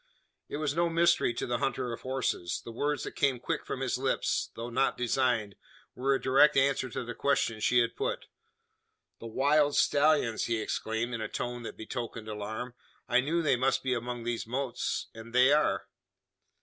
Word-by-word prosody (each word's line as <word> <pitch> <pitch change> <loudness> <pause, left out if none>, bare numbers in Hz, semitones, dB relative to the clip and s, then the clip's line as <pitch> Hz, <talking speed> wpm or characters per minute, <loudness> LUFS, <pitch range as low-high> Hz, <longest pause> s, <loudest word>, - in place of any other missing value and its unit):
It - - -4
was 150 -2 -1
no 170 0 +2
mystery 170 -4 +3
to - - -2
the 120 - -1
hunter 130 -3 -1
of 115 - -7
horses. 130 -9 -2
The 115 - -6
words 145 +5 -1
that - - -5
came 135 -3 +2
quick - - -3
from - - -4
his - - -1
lips - - 0
though 115 +1 -6
not 135 +3 +1
designed 120 -4 0 0.4
were 135 +2 +1
a - - -1
direct 135 +3 +5
answer 135 -1 +2
to 125 - -4
the 120 0 -6
question 115 -5 0
she 125 +3 +4
had 115 0 -1
put. - - -2 0.9
"The 115 - -7
wild 145 +5 +3
stallions!" 145 -6 +3
he 115 -1 0
exclaimed, 110 +2 -2
in 115 - -3
a 110 - -2
tone 120 +2 -4
that 115 - -7
betokened 115 -1 -6
alarm. 110 +3 -5 0.3
"I 125 - +4
knew 165 +6 0
they 145 - +3
must 130 +2 +1
be 130 -1 +1
among 120 0 -4
those 120 -1 -3
mottes; 130 0 -2
and 115 +1 -11
they 130 +3 +6
are!" 150 - +2
125 Hz, 190 wpm, -30 LUFS, 115-140 Hz, 0.9 s, they